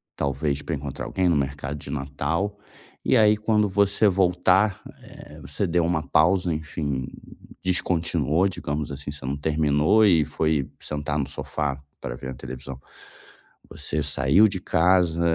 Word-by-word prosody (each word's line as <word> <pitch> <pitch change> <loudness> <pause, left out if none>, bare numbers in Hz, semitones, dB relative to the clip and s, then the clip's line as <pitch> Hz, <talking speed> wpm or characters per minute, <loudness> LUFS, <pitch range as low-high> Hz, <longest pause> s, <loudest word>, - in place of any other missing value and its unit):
talvez 70 +1 -1
pra 80 - -3
encontrar 70 -1 -6
alguém 90 -2 0
no 80 - +3
mercado 70 +1 -3
de 70 - -10
Natal, 75 +8 -2 0.4
e - - +3
aí 105 -1 +5
quando 105 -1 +2
você 100 +2 +3
voltar, 95 +2 +2 0.2
eh, - - -13
você 70 +9 -2
deu 85 -1 +1
uma 85 -2 -1
pausa, 90 +2 +3
enfim, 75 -4 -3 0.6
descontinuou, 85 -2 +1
digamos 75 -4 -4
assim, 70 +1 -7
você 70 -2 -7
não 70 +2 -2
terminou 75 +7 +3
e 85 -6 +4
foi 75 -2 -1
sentar 75 0 -3
no 70 - -1
sofá 70 -1 -4 0.2
pra - - -5
ver 65 +1 -8
uma 65 - -6
televisão. 65 +1 -8 0.9
Você 75 - -3
saiu 75 +8 +4
de 95 - -4
casa, 85 -1 +2
80 Hz, 150 wpm, -24 LUFS, 70-90 Hz, 0.9 s, aí